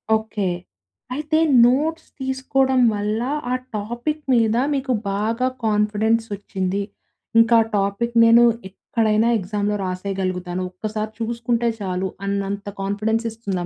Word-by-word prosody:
Okay. 220 -3 -2 0.7
అయితే 305 +3 0 0.3
notes 310 +6 +1
తీసుకోవడం 265 0 +1
వల్ల, 210 +2 -1 0.3
ఆ - - +2 0.2
టాపిక్ 240 +9 -3
మీద 225 -2 +3 0.2
మీకు 265 -2 0 0.2
బాగా 225 +5 0 0.2
కాన్ఫిడెన్స్ 215 +1 +2
ఒచ్చింది. 195 0 -3 0.6
ఇంకా 230 0 +6 0.2
టాపిక్‌ని 230 +4 +1
నేను 230 +1 +7 0.3
ఎక్కడైనా 220 +2 +1
ఎగ్జామ్‌లో 205 +2 -1
రాసేయగలుగుతాను. 185 -1 -3
ఒక్కసారి 215 +3 -4
చూసుకుంటే 235 +1 0
చాలు. 185 0 -2 0.2
అన్నంత 200 0 -2 0.2
కాన్ఫిడెన్స్ 215 +3 -1
ఇస్తుందా 195 -6 -4
220 Hz, 105 wpm, -22 LUFS, 200-235 Hz, 0.7 s, నేను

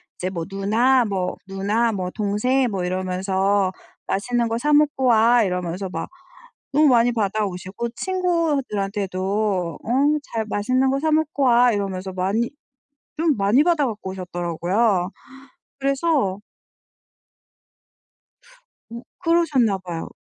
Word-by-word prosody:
이제 185 - -3
뭐 170 -3 -4
누나 225 +7 +2
뭐 195 -4 -2
누나 205 +4 0
뭐 185 -4 -3
동생 230 +5 0
뭐 190 -3 -2
이러면서 190 +1 0 0.3
"맛있는 240 +4 0
거 225 0 -1
사 295 +5 0
먹고 295 -3 +3
와." 235 0 +5
이러면서 180 0 -3
막 - - -5 0.6
너무 300 +2 +5
많이 240 -1 +4
받아오시고 205 0 -2
친구들한테도 210 - -1
어 - - -14 0.5
"잘 225 -1 -1
맛있는 255 +6 +1
거 275 - 0
사 315 +2 0
먹고 310 -2 +1
와." 245 -1 +5
이러면서 190 -2 -3
많이 195 +6 -1 0.7
좀 315 -3 +2
많이 205 +8 +3
받아 325 -5 +2
갖고 210 -4 -5
오셨더라고요. 180 +2 -1 0.7
그래서 275 - 0 2.5
어 235 +1 -8 0.2
그러셨나 315 - +2
봐요. 175 -3 -6
215 Hz, 245 characters per minute, -22 LUFS, 190-260 Hz, 2.5 s, 와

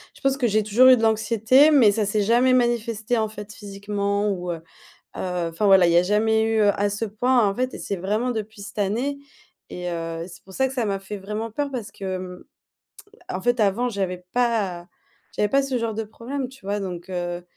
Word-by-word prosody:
Je - - -18
pense 270 -1 +1
que 255 - 0
j'ai 215 0 +2
toujours 215 +5 +4
eu 255 - +9
de 235 - -3
l'anxiété, 225 +6 +4
mais 245 -9 +6
ça 210 0 0
s'est 210 +1 0
jamais 240 +5 +3
manifesté, 235 -2 0
en 220 - +1
fait, 210 -1 -9
physiquement 200 0 -2
ou, 180 -2 -3
heu 165 -1 -5 0.6
heu, 180 -2 -2
enfin, 205 +6 -1
voilà, 190 -3 +6
il 170 - +3
y - - +4
a 175 - +6
jamais 220 +3 +2
eu, 225 0 +1
heu, 205 -1 +4
à 205 0 0
ce 205 +3 -2
point, 225 +1 +2
en 195 - -2
fait 255 +2 -2
et - - -7
c'est - - -4
vraiment 210 +7 -1
depuis 215 -2 -6
cette 205 +1 -10
année 240 +9 -1 0.5
et 180 0 -5
heu, 165 -1 -4
c'est 180 - -13
pour 190 - -15
ça 265 - +2
que 265 - -6
ça 245 - 0
m'a 195 -1 -1
fait 195 +2 -7
vraiment 210 +3 -5
peur 285 +4 -2
parce 240 -6 -6
que, 190 -1 -4
mmh, 180 -1 -9 0.9
en 185 - -3
fait, 245 +2 +1
avant, 215 +4 +2
j'avais 185 -4 -3
pas 210 -8 0 0.5
j'avais 210 -1 +1
pas 275 +3 +3
ce 270 -2 -2
genre 230 -2 -2
de 225 +1 -3
problème, 250 +5 -5
tu 265 -4 -16
vois? 205 +1 -1
Donc, 180 -2 -6
heu, 175 -1 -4
210 Hz, 230 wpm, -23 LUFS, 195-235 Hz, 0.9 s, eu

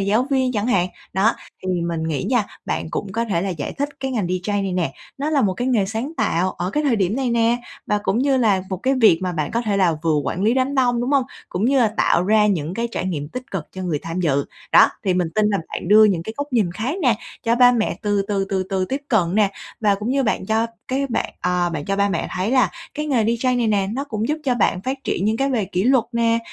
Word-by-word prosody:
giáo 215 +6 +2
viên 260 -2 +2
chẳng 210 0 -1
hạn. 185 -7 +2 0.2
Đó, 200 +5 +3 0.3
thì 185 - -5 0.2
mình 165 -1 -2
nghĩ 155 +4 -2
nha, 235 -1 +1 0.2
bạn 160 - -3
cũng 195 -2 -4
có 230 +1 0
thể 185 -7 -1
là 195 - -2
giải 160 -5 -4
thích 285 +1 -2
cái 265 -1 -2
ngành 220 -7 -1
DJ 185 +3 -1
này 190 -2 -2
nè, 170 -7 -1 0.3
nó 295 +3 -1
là 285 -3 +2
một 190 -3 +1
cái 245 +6 -2
nghề 215 -6 +2
sáng 230 +9 -4
tạo 185 -5 +1
ở 180 - -3
cái 300 - 0
thời 260 -6 +2
điểm 200 +3 0
này 260 -3 0
nè, 235 0 +3 0.3
và 210 - +1
cũng 215 - 0
như 270 0 +2
là 205 -7 +2
một 185 - -1
cái 265 +9 0
việc 165 -7 +7
mà 180 -1 -1
bạn 155 -3 -2
có 235 - 0
thể 210 -3 0
là 175 -5 +2
vừa 160 -2 +2
quản 185 - -2
lý 225 +4 +3
đám 265 +2 0
đông, 245 -3 +2
đúng 245 +3 -1
hông? 270 -3 +3 0.2
Cũng 185 +4 -2
như 270 +2 +3
là 230 - +4
tạo 170 - +3
ra 210 +1 +4
những 175 -3 -1
cái 235 0 -2
trải 185 - -3
nghiệm 150 -5 -3
tích 255 +5 -8
cực 185 -6 -3
cho 185 - -6
người 165 -5 -1
tham 165 +4 -4
dự. 140 -4 +1 0.3
Đó, - - +8 0.2
thì 185 - +2
mình 180 -2 +1
tin 215 -1 +3
là 200 - +1
bạn - - -5
đưa 215 +2 +8
những 185 -6 +2
cái 220 +5 -7
góc 285 -1 -5
nhìn 205 -8 +2
khác 255 - -3
nè 240 -6 +3 0.3
cho 230 0 +2
ba 245 0 +7
mẹ 225 -3 -1
từ 205 -1 +1
từ, 195 -1 0
từ 190 -1 0
từ 190 -1 0
tiếp 270 +8 -3
cận 185 -6 +2
nè, 210 -2 +3 0.3
và 205 -2 +3
cũng 210 +5 -3
như 275 0 +2
bạn 210 -4 -1
cho 220 +1 +1 0.2
cái 275 +2 0
bạn - - -2
ờ, 180 -1 +1
bạn 150 -3 -4
cho 195 0 -1
ba 200 0 +2
mẹ 170 -4 -2
thấy 185 +4 -2
là 250 -8 +3 0.2
cái 300 +1 -3
nghề 245 -7 +2
DJ 235 +3 +1
này 235 - +1
nè, 200 -3 +1
nó 275 +4 -2
cũng 220 -3 -3
giúp 305 - 0
cho 255 -2 +2
bạn 195 -4 +1
phát 260 +3 -2
triển 190 - -1
những 220 +1 +1
cái 275 +2 0
về 235 -6 +1
kỷ 185 +2 -2
luật 260 -2 +4
nè, 230 0 +2
215 Hz, 280 wpm, -21 LUFS, 185-245 Hz, 0.3 s, Đó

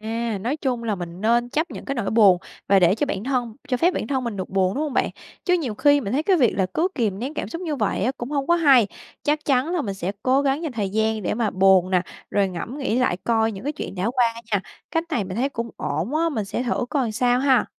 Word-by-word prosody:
À, 225 -1 -2
nói 250 +8 -1
chung 255 -5 -2
là 215 -2 0
mình 175 0 -7
nên 235 +2 +2
chấp 315 +6 -1
nhận - - -8
cái 275 - -3
nỗi 230 -6 -2
buồn 200 -5 +6 0.3
và 195 -1 +6
để 180 +1 +5
cho 290 - -1
bản 210 -6 -3
thân 245 -4 -1
cho 250 - +1
phép 350 +7 +2
bản - - -2
thân 265 -2 -1
mình 230 -4 -3
được 185 - -4
buồn, 190 -1 +1
đúng 295 - -1
hông 300 -3 -2
bạn? - - +1 0.3
Chứ 360 - +3
nhiều 270 -11 -1
khi 285 +4 +4
mình 215 -4 -4
thấy 290 +4 +1
cái 375 +1 +3
việc 250 -7 +3
là 190 -2 +2
cứ 350 +4 +2
kìm 210 -6 -1
nén 270 +6 -4
cảm - - -3
xúc 335 +2 -6
như 310 -4 -2
vậy 210 -3 0
á, 255 - +1
cũng 240 +4 -6
hông 280 -1 -1
có 340 - +4
hay. 275 -10 +5 0.4
Chắc 300 +1 0
chắn 280 +5 +1
là 330 - 0
mình 200 -3 -3
sẽ 190 +1 -3
cố 265 +2 +3
gắng 280 +3 0
dành 310 -5 -3
thời 205 -4 -2
gian 220 0 0
để - - -1
mà 225 -2 0
buồn 190 -1 +4
nè, 180 -1 +3 0.3
rồi 200 -1 +2
ngẫm 200 - -6
nghĩ 255 -3 0
lại 250 -8 +2
coi 225 -1 +2
những 195 +5 -9
cái 295 - -1
chuyện 290 - -6
đã 195 +5 -1
qua 250 -1 +3 0.3
nha. 200 - +3 0.3
Cách 325 +1 0
này 235 -9 0
mình 185 +2 -6
thấy 265 +4 +1
cũng 235 -4 -5
ổn 165 - -2
á, 330 +1 +2
mình 220 -10 -2
sẽ 235 - -3
thử 245 0 -1
coi 255 -7 0
sao 245 +2 +2
ha! 265 -3 +3
240 Hz, 285 wpm, -23 LUFS, 200-280 Hz, 0.4 s, buồn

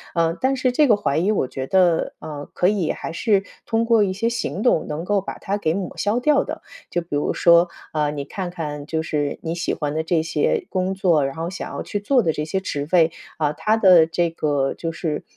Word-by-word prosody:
嗯， 165 -1 +2
但 265 +1 +2
是 255 -1 +1
这 295 +4 +4
个 215 -4 +5
怀 205 -9 0
疑 195 +6 +2
我 190 - 0
觉 130 +1 -5
得， 180 -2 +2
嗯， 150 -2 -7
可 180 - +3
以 190 -5 +1
还 - - -6
是 200 +2 +2 0.2
通 225 0 +1
过 230 -2 +4
一 195 - 0
些 210 +5 -1
行 230 -3 -2
动 245 - +2
能 155 +3 -4
够 205 0 +1
把 195 - -7
它 200 - -3
给 160 -4 0
抹 190 -3 -4
消 210 +4 +1
掉 285 +2 +3
的。 - - -7 0.3
就 175 - -1
比 170 - -32
如 145 - 0
说， 170 0 +5 0.2
啊， 150 -1 0
你 145 -1 -4
看 185 +3 -5
看 150 -4 -6
就 160 0 -1
是 145 -2 -2
你 165 0 -2
喜 170 -1 -2
欢 150 -1 -3
的 160 - 0
这 165 0 +1
些 450 - 0
工 185 0 -1
作， 175 -6 +3
然 135 - -6
后 165 +1 -3
想 190 - -6
要 - - -5
去 205 - -3
做 245 +4 +2
的 160 - +1
这 150 - -3
些 175 +5 -2
职 145 -6 -4
位， 165 -3 +4 0.3
啊， 150 -2 0
它 215 +8 +1
的 185 -6 +7
这 170 +1 0
个 145 -4 0
就 165 - -4
是 160 -2 -3
175 Hz, 260 characters per minute, -22 LUFS, 155-205 Hz, 0.3 s, 的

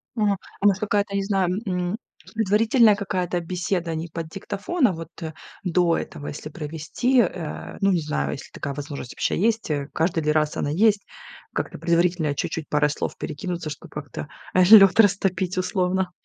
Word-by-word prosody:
Мгм. 210 -2 +2 0.3
А 200 - -2
может, 195 0 +4
я 205 -1 +4
не 195 - +1
знаю, 195 -1 0
м, 180 +1 -1 0.4
предварительная 220 +1 +4
какая-то 185 -3 -2
беседа 175 -1 -2
не 160 +2 -4
под 165 0 -5
диктофон, 205 - -1
а - - +1
вот, 165 -1 -7
э, 160 -1 -5 0.3
до 175 -2 +2
этого, 145 - -6
если 150 +1 -6
провести, 160 - -1
э. 175 -7 -2
Ну, 195 - +4
не 180 - +2
знаю, 150 0 -2
если 140 - -9
такая 140 -1 -5
возможность 145 -4 -6
вообще - - -1
есть, 225 -3 +1
э, 140 -2 -1
каждый 165 0 +1
ли 150 - +2
раз 150 -1 +1
она - - -1
есть. 205 +6 +3 0.5
Как-то - - -3
предварительно 170 -3 +1
чуть-чуть 155 +2 -3
парой 150 0 +3
слов - - -4
перекинуться, 170 +1 -4
чтоб - - -9
как-то, 150 0 -7 0.3
э, 185 - +5
лед 195 -1 +8
растопить, 190 -3 +3
условно. 185 0 0
180 Hz, 175 wpm, -24 LUFS, 160-200 Hz, 0.5 s, лед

